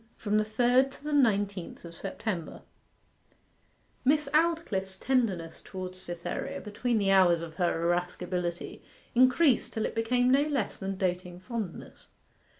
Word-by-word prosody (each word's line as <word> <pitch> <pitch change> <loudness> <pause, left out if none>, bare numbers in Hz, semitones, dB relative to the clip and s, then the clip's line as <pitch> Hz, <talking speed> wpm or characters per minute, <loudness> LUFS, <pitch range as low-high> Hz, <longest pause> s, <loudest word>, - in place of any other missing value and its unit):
FROM 210 0 +1
THE - - +2
THIRD 245 +5 +3
TO 275 - -15
THE 300 0 -3
NINETEENTH 205 -10 +1
OF 170 - -9
SEPTEMBER 175 0 -5 1.4
Miss 295 +2 +3
Aldclyffe's 305 - +1
tenderness 200 -10 0
towards 185 -1 -6
Cytherea, 175 +11 -4
between 230 +3 -1
the 200 -2 +2
hours 175 -3 +5
of 160 -1 -9
her 175 -2 +2
irascibility, 175 0 -2 0.3
increased 255 +2 +4
till 220 - -1
it - - -3
became 245 +2 +2
no 275 +2 +5
less 290 -2 -1
than 195 -1 -4
doting 180 -1 -2
fondness. 215 -3 -6
205 Hz, 135 wpm, -29 LUFS, 180-255 Hz, 1.4 s, hours